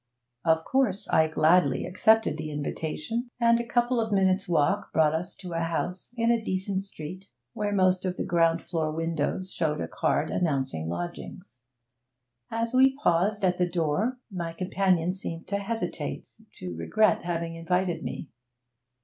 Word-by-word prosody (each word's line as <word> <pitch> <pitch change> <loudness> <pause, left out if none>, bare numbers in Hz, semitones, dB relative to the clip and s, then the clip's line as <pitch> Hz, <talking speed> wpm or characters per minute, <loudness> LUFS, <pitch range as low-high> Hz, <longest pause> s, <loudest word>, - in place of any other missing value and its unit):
Of 160 -1 +2
course 250 -7 +1
I 160 0 +4
gladly 155 -2 +3
accepted 220 -2 +3
the 155 0 -5
invitation, 155 - -3
and 235 -1 +4
a - - -1
couple 240 0 +1
of 220 -1 -3
minutes' 195 -1 +2
walk 150 -4 +1
brought 155 -1 +3
us 175 +3 -3
to 180 -3 -8
a 165 - -1
house 175 +6 -3
in 230 0 +3
a 230 -1 +1
decent 190 0 -1
street 185 0 -9 0.3
where 210 -1 -2
most 185 -2 +3
of 185 -1 -2
the - - -1
ground 165 -1 +2
floor 160 -3 -2
windows 165 +3 -2
showed 150 -3 -1
a - - -2
card 155 - 0
announcing 135 - -1
lodgings. 175 - -7 0.9
As 230 +1 -2
we 265 +1 +5
paused 200 -2 +2
at 180 -1 +2
the 180 0 +2
door, 175 +9 0
my 170 -3 -4
companion 185 -1 +1
seemed 165 -3 -6
to 200 0 0
hesitate, 225 +3 -4 0.3
to 90 -2 -7
regret 215 - +2
having 170 -1 -2
invited 170 0 -1
me. 145 - -5
180 Hz, 160 wpm, -27 LUFS, 160-205 Hz, 0.9 s, we